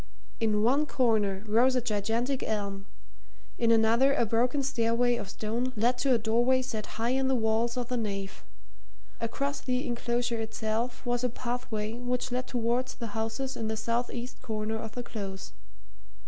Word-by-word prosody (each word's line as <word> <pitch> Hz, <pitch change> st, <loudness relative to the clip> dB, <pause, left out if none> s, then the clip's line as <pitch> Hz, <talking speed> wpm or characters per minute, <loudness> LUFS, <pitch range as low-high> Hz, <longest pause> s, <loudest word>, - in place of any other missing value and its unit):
In 215 Hz, -2 st, +2 dB
one 280 Hz, +6 st, +3 dB
corner 215 Hz, -7 st, +2 dB
rose 240 Hz, +5 st, +4 dB
a -, -, +4 dB
gigantic 230 Hz, +3 st, 0 dB
elm; 200 Hz, -2 st, -2 dB, 0.7 s
in 230 Hz, -, +3 dB
another 230 Hz, +5 st, +5 dB
a 235 Hz, -, +3 dB
broken 245 Hz, +6 st, +2 dB
stairway 240 Hz, -2 st, +2 dB
of 205 Hz, -4 st, -5 dB
stone 235 Hz, +5 st, -2 dB
led 240 Hz, +3 st, +2 dB
to 265 Hz, +2 st, +2 dB
a -, -, +4 dB
doorway 240 Hz, +4 st, +3 dB
set 220 Hz, -4 st, -4 dB
high 230 Hz, +2 st, +1 dB
in 265 Hz, 0 st, +2 dB
the 265 Hz, -, +3 dB
walls 230 Hz, +1 st, +1 dB
of 245 Hz, -1 st, -1 dB
the 250 Hz, -, 0 dB
nave; 195 Hz, -4 st, -4 dB, 0.8 s
across 275 Hz, +5 st, -2 dB
the 255 Hz, 0 st, -1 dB
enclosure 240 Hz, 0 st, -1 dB
itself 225 Hz, +3 st, -2 dB
was 245 Hz, 0 st, 0 dB
a 250 Hz, -, +2 dB
pathway 235 Hz, -3 st, -3 dB
which 245 Hz, +1 st, -2 dB
led 250 Hz, +1 st, -1 dB
towards 245 Hz, +1 st, 0 dB
the 230 Hz, -4 st, -6 dB
houses 225 Hz, +5 st, -2 dB
in 225 Hz, -, -2 dB
the 220 Hz, 0 st, -2 dB
south 230 Hz, +2 st, 0 dB
east 245 Hz, +1 st, -6 dB
corner 220 Hz, -2 st, -2 dB
of 220 Hz, -1 st, -6 dB
the 245 Hz, -, -4 dB
Close. 195 Hz, -, -6 dB
235 Hz, 170 wpm, -29 LUFS, 220-250 Hz, 0.8 s, another